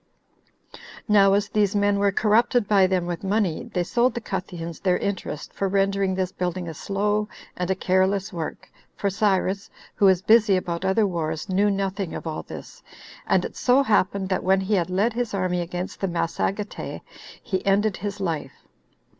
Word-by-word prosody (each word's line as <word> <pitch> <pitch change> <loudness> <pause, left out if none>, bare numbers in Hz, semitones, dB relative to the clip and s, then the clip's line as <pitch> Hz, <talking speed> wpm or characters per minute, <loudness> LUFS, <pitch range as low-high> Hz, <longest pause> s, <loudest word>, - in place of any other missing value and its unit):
Now 200 -2 +5
as 200 0 +2
these 210 -2 +1
men 205 0 +2
were 200 0 +3
corrupted 225 +2 +2
by 195 -3 +5
them 185 -2 0
with 175 +1 -4
money, 195 -4 0
they 180 - 0
sold 240 +7 +1
the - - -1
Cutheans 175 -5 -5
their 185 -2 +2
interest 190 -6 -4
for 195 - -1
rendering 195 0 +1
this 185 -1 -1
building 180 0 -3
a 165 - -5
slow 205 +5 -1 0.3
and 180 0 -3
a 190 - +2
careless 190 +1 +1
work, 165 -3 -5 0.3
for 200 - -1
Cyrus, 195 -1 0 0.2
who 200 - +2
was 190 -1 +4
busy 215 -3 +5
about 175 -1 -3
other 190 +3 +2
wars, 165 -4 -3
knew 200 +2 +3
nothing 195 -2 -2
of - - -6
all 155 -1 -3
this; - - -10 0.5
and - - +2
it - - -7
so 260 +2 +3
happened, 200 -4 +1
that 185 - 0
when 190 +1 +3
he 195 +3 -1
had 180 -3 +1
led 200 +6 +1
his 240 -3 -2
army 180 -2 0
against 175 +2 -5
the 195 - +1
Massagetae, 190 +4 -3 0.4
he 190 -2 -2
ended 200 +1 +2
his 205 +2 -5
life. 160 -8 -4
195 Hz, 180 wpm, -24 LUFS, 180-205 Hz, 0.5 s, Now